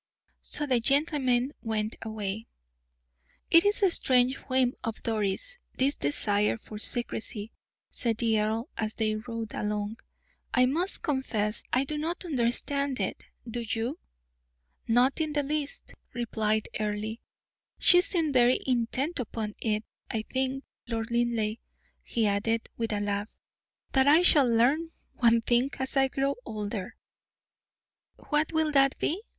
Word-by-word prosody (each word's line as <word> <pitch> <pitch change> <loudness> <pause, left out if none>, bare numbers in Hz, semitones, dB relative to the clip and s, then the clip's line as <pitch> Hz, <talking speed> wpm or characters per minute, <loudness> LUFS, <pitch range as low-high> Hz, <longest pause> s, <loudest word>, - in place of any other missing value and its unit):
So 295 - -3
the 255 -4 +2
gentlemen 270 -1 +2
went 220 -1 -2
away. 220 0 -4 1.0
"It 335 +1 +7
is 410 0 +2
a 380 - +5
strange 255 -4 +3 0.2
whim 255 -1 +3
of 225 -1 -5
Doris', 225 - -1 0.2
this 275 +2 +3
desire 205 +10 +1
for 215 -1 -10
secrecy," 225 -2 +2 0.4
said 230 -4 +1
the 225 -2 +2
earl, 220 +4 -1
as 215 0 -3
they 215 -1 0
rode 225 0 -5
along. 210 +1 -3 0.6
"I 255 -1 +5
must 335 +9 +1
confess 230 -7 -1
I 255 - +2
do 300 +2 -4
not 335 +4 -3
understand 280 0 0
it; - - -3 0.2
do 235 +1 -4
you?" 230 +5 -3 0.9
"Not 250 +6 +3
in 310 -1 -1
the 290 -1 +1
least," 290 0 -3 0.2
replied 220 -3 -1
Earle, 215 +1 -2 0.6
"she 355 0 +7
seemed 330 -6 +1
very 250 0 +4
intent 260 +6 -1
upon 220 -3 -4
it. 215 -1 -1 0.2
I 220 -1 -2
think, 265 +1 -1 0.2
Lord 225 0 -3
Linleigh," 235 -2 0 0.4
he 230 -2 -1
added, 215 +3 0
with 225 -1 -3
a 205 -1 -1
laugh, 205 +1 -2 0.6
"that 265 0 +3
I 310 +5 +6
shall 290 -7 +6
learn 265 +9 +2 0.3
one 235 -2 +4
thing 240 +3 +2
as 265 +1 0
I 270 0 +4
grow 275 +1 -1
older." 210 -2 -5 1.2
"What 300 +1 -1
will 315 -1 +1
that 275 -1 +3
be?" 355 +6 -1
240 Hz, 140 wpm, -28 LUFS, 220-275 Hz, 1.2 s, It